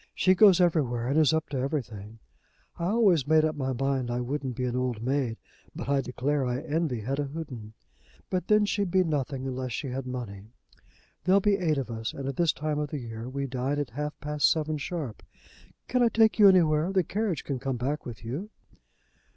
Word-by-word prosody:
She 185 - +4
goes 190 -1 +6
everywhere, 130 -9 +1
and 145 +3 +3
is 155 -1 +5
up 160 0 0
to 140 - -3
everything. 115 -6 -4 0.6
I 170 - -1
always 190 - +3
made 155 0 +5
up 155 -1 -1
my 135 -2 -2
mind 130 -1 -1
I 120 0 -1
wouldn't 130 0 -3
be 125 - -2
an 125 -1 -2
old 125 -3 -2
maid, 130 -3 0 0.4
but - - -6
I 140 0 +2
declare 135 +3 -1
I 125 0 -1
envy 150 -7 -1
Hetta 135 +6 -2
Houghton. 125 -9 -7 0.6
But 185 -1 -1
then 210 0 +4
she'd 200 -2 0
be 185 +1 +3
nothing 140 -4 -2
unless 130 -2 -3
she 135 - -3
had 130 +1 -4
money. 110 -6 -6 0.8
There'll 190 +2 +5
be 200 0 +2
eight 160 -5 +1
of 130 -3 -3
us, 110 -1 -4
and 135 -1 -5
at 135 - -3
this 170 -3 +3
time 150 +2 -2
of 150 -1 -2
the 150 - -4
year 115 -1 -6
we 140 +1 -3
dine 130 +2 -2
at 145 -4 -3
half 150 +4 -4
past 150 +1 +2
seven, 155 -1 0
sharp. 150 - -5 0.7
Can 250 +1 +1
I 240 - +6
take 225 0 +3
you 205 -2 +9
anywhere? 165 -2 +3
The 190 -2 +2
carriage 200 -2 -2
can 135 -3 -3
come 135 -1 -2
back 140 +5 -2
with 115 -1 -9
you?" 150 - -4
140 Hz, 210 wpm, -28 LUFS, 125-165 Hz, 0.8 s, you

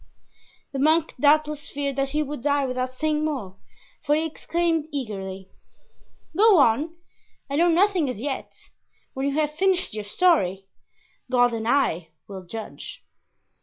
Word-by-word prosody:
The 270 - -2
monk 315 +3 +3
doubtless 300 +1 +2
feared 280 -1 -3
that 275 0 0
he 300 +2 0
would 290 -3 -6
die 285 +1 +1
without 255 0 -3
saying 305 +2 0
more, 255 -12 -3 0.4
for 295 0 +2
he 315 +1 0
exclaimed 330 0 -1
eagerly: 195 -8 -5 0.8
"Go 425 -1 +6
on, 285 +5 +3 0.6
I - - 0
know 340 +2 +4
nothing, 350 -3 +3
as 250 - -5
yet; 270 +2 -6 0.4
when 270 0 -2
you 280 - -1
have 300 -1 +1
finished 375 - +1
your 215 -1 -4
story, 200 - +2 0.6
God 245 -1 +3
and 225 -1 -3
I 205 - +1 0.2
will 190 -2 -8
judge." 220 +5 -8
285 Hz, 145 wpm, -24 LUFS, 235-310 Hz, 0.8 s, Go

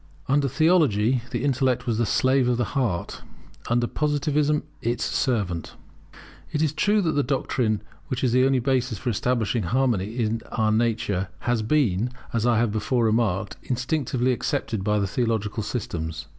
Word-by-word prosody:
[Under 140 +1 +2
Theology 135 - +3
the - - -3
intellect 130 -2 +1
was 115 -3 0
the 120 - +1
slave 130 +3 +2
of 125 -1 +2
the 120 - +1
heart; 115 -11 -1 0.5
under 120 0 +2
Positivism, 150 +2 0 0.2
its 120 +1 -1
servant] 100 - -1 0.8
It 155 0 0
is 155 -2 +1
true 205 +7 +2
that 165 - +1
this 145 -2 +1
doctrine, 120 -5 0 0.2
which 130 0 -3
is 125 - +2
the 130 +1 +4
only 135 0 +3
basis 125 -2 0
for 120 +4 -2
establishing 115 +1 0
harmony 110 0 0
in 115 -1 0
our 110 -2 +2
nature, 110 -4 0
had 120 -3 0
been, 120 -5 +2 0.2
as 115 0 +1
I 120 -1 +3
before 115 +3 0
remarked, 110 -4 0
instinctively 125 0 -1
accepted 110 -4 -2
by 105 0 +1
theological 110 0 -1
systems. 80 -9 -4
120 Hz, 155 wpm, -24 LUFS, 110-135 Hz, 0.8 s, the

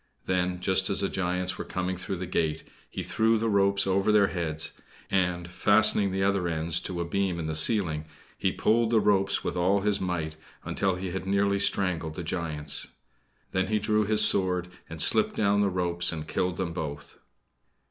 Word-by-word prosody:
Then, 90 -1 -1
just 95 0 +2
as 100 - +2
the 100 - 0
giants 90 0 -2
were - - -3
coming 90 0 -3
through 90 +2 -5
the 90 +1 -5
gate 80 -3 -1 0.3
he - - -5
threw 110 +1 +1
the 115 +1 -1
ropes 100 0 +2
over 95 +2 +1
their 105 -2 +4
heads, 80 -3 -2 0.4
and, 90 -2 0
fastening 100 +2 +3
the 95 0 -1
other 100 -2 +1
ends 80 +1 +2
to 90 -2 -5
a - - -2
beam 95 0 -1
in 85 - -4
the 80 - -3
ceiling, 80 -2 +2 0.3
he - - 0
pulled 115 +1 +1
the 115 -1 +3
ropes 95 -2 +1
with - - -3
all 95 +3 +2
his 105 0 0
might 80 -4 -3 0.3
until 95 -2 0
he 90 0 -5
had 95 +1 -5
nearly 100 0 +1
strangled 90 -5 0
the 90 - -5
giants. 80 -3 -2 0.6
Then 95 0 0
he 110 +2 +1
drew 105 +1 +1
his 105 +1 +5
sword 90 -3 +2 0.2
and 80 - -8
slipped - - +3
down 100 -1 +2
the 100 - +2
ropes 85 -2 0
and 80 -2 -6
killed 90 0 -2
them 90 -3 -3
both. 75 -4 -7
95 Hz, 190 wpm, -27 LUFS, 85-100 Hz, 0.6 s, his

